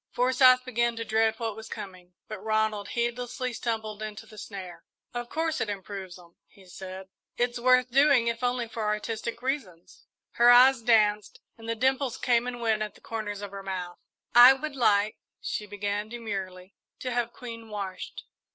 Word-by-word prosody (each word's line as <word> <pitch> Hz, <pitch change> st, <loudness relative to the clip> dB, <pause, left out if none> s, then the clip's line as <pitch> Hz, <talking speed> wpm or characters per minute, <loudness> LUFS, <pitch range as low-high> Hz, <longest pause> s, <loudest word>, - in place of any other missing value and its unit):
Forsyth 255 Hz, 0 st, +4 dB
began 235 Hz, -1 st, 0 dB
to 230 Hz, 0 st, -4 dB
dread 220 Hz, 0 st, +2 dB
what 225 Hz, -3 st, -3 dB
was 220 Hz, 0 st, -10 dB
coming, 180 Hz, -2 st, -9 dB
but 215 Hz, -2 st, -8 dB
Ronald 215 Hz, -2 st, 0 dB
heedlessly 245 Hz, +1 st, -2 dB
stumbled 220 Hz, -2 st, -3 dB
into 215 Hz, -1 st, -6 dB
the 215 Hz, -1 st, -13 dB
snare. 190 Hz, -4 st, -8 dB, 0.3 s
"Of 240 Hz, 0 st, -5 dB
course 320 Hz, 0 st, -1 dB
it 215 Hz, -, -1 dB
improves 195 Hz, -2 st, -6 dB
'em," 170 Hz, -1 st, -19 dB
he 195 Hz, -, -20 dB
said. 190 Hz, +1 st, -9 dB, 0.3 s
"It's 245 Hz, 0 st, 0 dB
worth 255 Hz, 0 st, +4 dB
doing, 275 Hz, -2 st, +5 dB
if 230 Hz, +1 st, -2 dB
only 245 Hz, -1 st, 0 dB
for 225 Hz, 0 st, -6 dB
artistic 215 Hz, +3 st, -3 dB
reasons." 215 Hz, -, -5 dB, 0.2 s
Her 240 Hz, 0 st, +5 dB
eyes 250 Hz, +1 st, +7 dB
danced 210 Hz, -3 st, +2 dB, 0.2 s
and 225 Hz, 0 st, -10 dB
the 230 Hz, -, 0 dB
dimples 260 Hz, +1 st, 0 dB
came 240 Hz, 0 st, +1 dB
and 245 Hz, -1 st, -5 dB
went 220 Hz, -2 st, +1 dB
at 210 Hz, -1 st, -4 dB
the -, -, -17 dB
corners 205 Hz, -2 st, -5 dB
of 200 Hz, -, -6 dB
her 200 Hz, 0 st, -7 dB
mouth. 185 Hz, -2 st, -5 dB, 0.3 s
"I 245 Hz, +2 st, +10 dB
would 285 Hz, +2 st, -5 dB
like," 210 Hz, -4 st, +2 dB, 0.2 s
she 210 Hz, -, -4 dB
began 205 Hz, +1 st, -3 dB
demurely, 195 Hz, -5 st, -6 dB, 0.3 s
"to 255 Hz, -, -3 dB
have 240 Hz, -1 st, -1 dB
Queen 230 Hz, -2 st, -9 dB
washed." 195 Hz, -3 st, -6 dB
225 Hz, 175 wpm, -27 LUFS, 205-245 Hz, 0.3 s, I